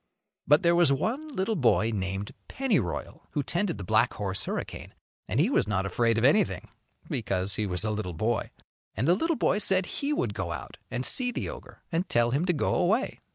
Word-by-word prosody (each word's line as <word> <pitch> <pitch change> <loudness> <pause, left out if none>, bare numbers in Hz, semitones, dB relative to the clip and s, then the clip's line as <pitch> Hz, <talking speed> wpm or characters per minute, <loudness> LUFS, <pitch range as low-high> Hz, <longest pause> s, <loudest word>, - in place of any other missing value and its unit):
But 150 +5 +5
there 170 0 +5
was 170 -4 +5
one 240 - -1
little 225 -6 -1
boy 115 - +3
named 95 0 -3 0.2
Pennyroyal, 200 - -2
who 145 - 0
tended 175 +5 -1
the 100 - -6
black 110 +6 +2
horse 95 -2 -2
Hurricane, - - -5 0.3
and 115 - 0
he 165 - +4
was - - +2
not 95 -2 0
afraid 115 +4 +1
of 115 - +1
anything 175 +7 +2 0.4
because 100 -4 0
he 105 - 0
was 90 0 -1
a 110 - 0
little 105 -5 -3
boy. 110 +7 -1 0.5
And 115 +8 0
the 170 - +6
little 330 - +1
boy 210 -4 +1
said 190 -2 +2
he 280 +9 -3
would 120 - 0
go - - -3
out - - -7
and 125 +1 -2
see 250 -1 +2
the - - -3
ogre - - -11
and 170 +3 -1
tell 120 0 +2
him 145 +7 +1
to - - +4
go 150 - 0
away. 220 +9 +1
130 Hz, 205 wpm, -28 LUFS, -, 0.5 s, the